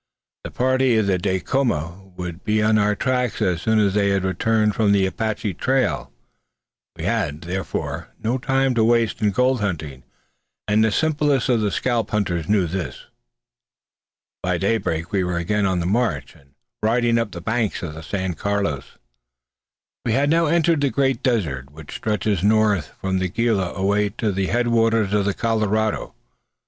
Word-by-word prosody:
The - - -5
party 130 -1 +2
of 110 - +2 0.2
Dacoma 95 - -1
would 90 0 -6
be 110 0 +1
on 110 0 +3
our 105 0 +2
track 125 -1 -1
as 90 -2 0
soon 110 0 +2
as 100 -3 +3
they 100 -1 +2
had 100 -1 +1
returned 105 +3 +1
from 105 -2 +2
the 100 -1 +3
Apache 105 0 -2
trail. 130 +9 0 0.8
We - - -7
had, 75 +2 -1
therefore, 90 +2 -4
no 120 +4 -1
time 135 +1 +1
to 115 -2 +2
waste 115 -1 +2
in 105 - +3
gold 125 +4 +1
hunting, 75 -9 -3 0.7
and 105 +1 +3
the 110 - +2
simplest 145 -2 +1
of 120 -3 +3
the 105 - +1
scalp 115 +3 -1
hunters 90 -6 -1
knew 100 -3 +3
this. 90 +2 -5 1.4
By 90 -1 0
daybreak 90 -4 -1
we 100 -2 +1
were 90 -1 -2
again 100 +4 0
on 95 -2 0
the 85 - -2
march, 90 - 0
and 70 0 -24 0.3
riding 115 +1 +2
up 115 -2 -1
the 85 - -8
banks 110 +3 -1
of 80 -3 -5
the 80 - -8
San 95 +2 -3
Carlos. 100 -4 -2 1.1
We 115 - 0
had 140 +4 +2
now 165 0 +3
entered 165 -1 +2
the 140 - +2
great 135 -3 0
desert 75 - -1
which 75 0 -11
stretches 105 -3 -1
northward 105 -4 +3
from 95 -1 -1
the 95 0 -1
Gila 105 -3 0
away 100 +2 +1
to 110 -3 0
the 95 0 -1
head 120 +2 +1
waters 115 -3 +2
of 105 -2 +2
the 100 - 0
Colorado. 110 -1 0
105 Hz, 170 wpm, -22 LUFS, 95-115 Hz, 1.4 s, on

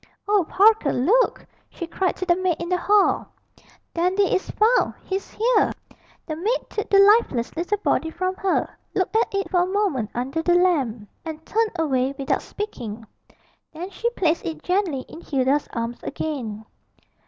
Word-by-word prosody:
'Oh, 410 -2 +3
Parker, 415 -6 +4
look!' 430 - +2 0.2
she 345 - -6
cried 365 +2 -1
to 370 - -4
the 345 -1 +4
maid 370 -2 0
in 345 - -4
the 360 - +2
hall, 405 +2 +3 0.7
'Dandy 365 +3 +2
is 375 - -1
found 450 +4 +2
he's 385 +1 -4
here!' 475 +3 +2 0.5
The 310 - -4
maid 425 +10 0
took 425 - -3
the 395 - +5
lifeless 395 - +4
little 350 +5 -1
body 325 -5 0
from 370 +3 -2
her, 390 -2 +1 0.3
looked 375 +3 0
at 450 - +2
it 395 -1 -2
for 365 - +3
a 355 - +1
moment 375 - 0
under 265 +6 -2
the 350 +2 +3
lamp, 275 - +1 0.2
and 320 -1 -7
turned 445 0 0
away 270 -4 0
without 275 - 0
speaking. 230 - -6 0.7
Then 350 +5 -6
she 470 - -1
placed 340 -8 0
it 315 -2 -5
gently 360 -7 0
in 325 - -12
Hilda's 275 0 0
arms 230 +1 -4
again. 235 -9 -4
355 Hz, 165 wpm, -23 LUFS, 280-400 Hz, 0.7 s, the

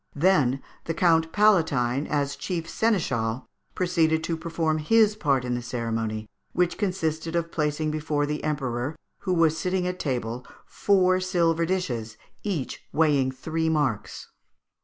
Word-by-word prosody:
Then 145 -6 +3 0.2
the 165 - -2
Count 165 -2 +3
Palatine, 155 - +3
as 140 -1 -1
chief 170 -3 -4
seneschal, 130 - 0 0.3
proceeded 165 -3 +2
to 165 - -1
perform 160 -1 -1
his 215 +6 +4
part 140 -10 +1
in 125 - -1
the 120 - -2
ceremony, 115 -3 -3 0.3
which 175 0 +1
consisted 165 -5 -1
of 170 0 -1
placing 150 0 -1
before 150 -1 -1
the 150 +1 -3
Emperor, 135 -2 -2 0.2
who 185 - -1
was 165 -2 +3
sitting 180 +1 -1
at 180 0 -3
table, 125 -3 -2 0.2
four 185 -2 +2
silver 170 -3 +1
dishes, 125 -12 -2 0.2
each 180 -11 -3
weighing 145 -4 +3
three 160 +4 -2
marks. 130 -10 -1
160 Hz, 140 wpm, -26 LUFS, 130-180 Hz, 0.3 s, his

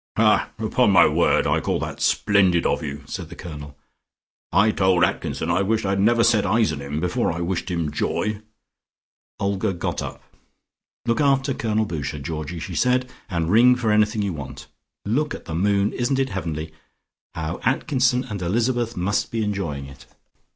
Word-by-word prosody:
'" - - -22
"Ha! - - +3
Upon - - +2
my - - +7
word, - - +2
I - - +2
call - - -1
that - - -5
splendid 95 -5 +3
of - - +1
you," 75 -2 -6
said 85 +2 -6
the 85 - -10
Colonel. 75 -6 -9 0.7
"I 105 +2 +4
told 95 -3 +2
Atkinson 85 -1 -1
I 85 +3 +2
wished 110 +2 0
I 95 - 0
had 100 - 0
never 115 +3 +4
set 115 -3 +4
eyes 110 -7 +2
on 70 - -6
him, 70 +2 -4
before 90 +1 0
I 85 - -4
wished 90 +2 -2
him 85 -4 -2
joy." 105 +7 -2 1.0
Olga 100 0 0
got 85 - -3
up. - - -7 0.8
"Look 115 +5 +1
after 135 -1 +2
Colonel 110 -2 0
Boucher, 75 -5 -4
Georgie," 75 +3 -5
she 80 - -6
said, 125 0 +1 0.2
"and 85 -3 -1
ring 125 +4 +6
for 120 -3 0
anything 105 0 +2
you 100 -3 -2
want. 70 -4 -8 0.4
Look 145 +9 0
at - - -11
the 80 - -6
moon! 100 +4 +1
Isn't 125 +2 0
it 135 0 0
heavenly. 80 -6 -4 0.6
How 80 +1 -4
Atkinson 130 -2 +1
and 105 -7 -6
Elizabeth 120 +5 0
must 95 +3 0
be 115 -1 -1
enjoying 85 -10 -3
it." 70 0 -13
100 Hz, 180 wpm, -23 LUFS, 85-115 Hz, 1.0 s, my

